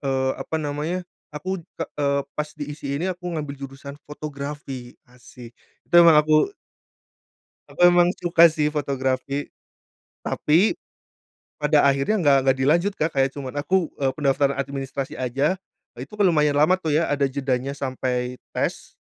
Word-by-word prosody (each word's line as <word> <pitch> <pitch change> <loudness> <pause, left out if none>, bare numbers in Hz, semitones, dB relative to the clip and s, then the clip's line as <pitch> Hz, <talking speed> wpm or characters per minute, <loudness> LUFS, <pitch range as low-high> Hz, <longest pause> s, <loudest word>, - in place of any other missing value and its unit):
Eee, 135 -1 0
apa 160 - -4
namanya 150 +5 -3 0.3
aku 185 +5 -4 0.2
ke 165 - -2 0.2
eee, 140 0 +2 0.2
pas 150 0 -2
di 145 - -3
ISI 145 -1 -9
ini 180 - -2
aku 180 0 -18
ngambil 145 -2 -4
jurusan 135 +1 -8
fotografi 140 -4 -7 0.2
asik 120 -1 -14 0.3
itu - - -10
memang 165 -2 +7
aku 155 - +3 1.2
aku - - -12
emang 175 0 +6
suka 170 -1 +5
sih 150 -1 0
fotografi, 140 -1 -2 0.8
tapi, 170 +8 +2 0.9
pada 150 0 +3
akhirnya 140 +8 +2
nggak 140 -2 +5
nggak 135 - +5
dilanjut 170 +9 +2
Kak 160 +1 -1
kayak 135 -1 0
cuman 135 -3 -5
aku, 180 +2 0
eee, 135 -1 +1
pendaftaran 140 -1 +1
administrasi 135 -1 -4
aja, 135 +8 0 0.4
itu 135 +10 -9
kan 210 - +1
lumayan 150 -5 +3
lama 170 +6 +4
tuh 155 -5 -1
ya 165 +1 +1
ada 140 -1 +2
jedanya 135 0 -2
sampai 125 -2 -3 0.2
tes, - - -3
145 Hz, 150 wpm, -23 LUFS, 135-160 Hz, 1.2 s, memang